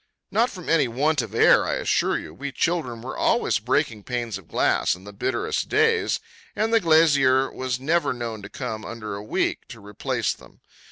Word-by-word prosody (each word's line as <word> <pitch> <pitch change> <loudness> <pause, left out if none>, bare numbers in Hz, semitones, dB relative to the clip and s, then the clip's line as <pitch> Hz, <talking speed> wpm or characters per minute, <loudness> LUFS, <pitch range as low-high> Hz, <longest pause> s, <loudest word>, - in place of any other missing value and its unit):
Not 230 +5 +2
from 180 -4 -10
any 150 -5 +3
want 145 +5 +1
of 115 -2 -7
air, - - +6
I - - -1
assure - - +1
you, 80 - -8
we 140 - -6
children 130 -8 -1
were 130 - -6
always 120 - +1
breaking 120 -1 0
panes 120 -2 -3
of 90 - -19
glass - - +1
on 90 - -15
the 105 +1 -10
bitterest 120 +4 -2
days, 445 +1 +2 0.4
and 225 +1 0
the 230 - +6
glazier 145 -6 +4
was 130 -1 -3
never 165 +6 +1
known 115 -3 -5
to 100 - -9
come 110 0 -5
under 110 -2 -6
a 100 - -5
week 105 - -1
to 115 - -11
replace 105 -1 -2
them. - - -18
130 Hz, 190 wpm, -24 LUFS, 110-160 Hz, 0.4 s, air